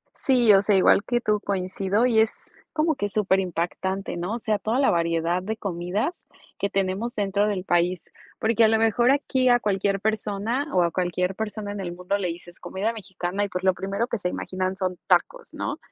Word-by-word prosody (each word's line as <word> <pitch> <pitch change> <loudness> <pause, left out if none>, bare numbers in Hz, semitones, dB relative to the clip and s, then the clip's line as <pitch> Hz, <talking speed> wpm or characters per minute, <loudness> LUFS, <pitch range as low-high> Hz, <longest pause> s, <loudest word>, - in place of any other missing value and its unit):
Sí, 245 -5 +4
o 195 - +6
sea, 205 0 +2
igual 195 +1 +5
que 240 +1 0
tú 210 -2 +1
coincido 195 +3 0
y 230 -3 +3
es 220 0 -1 0.2
como 315 0 +1
que 205 -5 -2
superimpactante, 190 -1 -1
¿no? 180 +5 -3
O 240 - -4
sea, 215 -2 0
toda 225 +4 0
la 275 - +4
variedad 170 +1 +1
de 215 +4 -4
comidas 195 - -3 0.3
que 200 - -1
tenemos 195 +5 -1
dentro 205 0 +1
del 200 -3 -2
país. 175 -1 0 0.3
Porque 225 +1 +3
a - - +6
lo 220 0 +3
mejor 225 +3 +3
aquí 260 -2 +2
a 245 0 +5
cualquier 195 -1 0
persona 220 +5 -1
o 180 -1 +4
a 170 - +1
cualquier 180 +1 -1
persona 210 -1 -4
en 205 - -5
el 175 -3 -4
mundo 180 +3 -2
le 190 -3 -2
dices 175 +1 -8
"comida 205 +4 -2
mexicana" 190 -2 -3
y 200 - -6
pues 180 0 -4
lo 190 0 +4
primero 195 +5 -2
que 235 - -3
se 180 - -1
imaginan 185 +1 -3
son 185 -2 -2
tacos, - - +1
¿no? - - -3
200 Hz, 205 wpm, -25 LUFS, 185-220 Hz, 0.3 s, o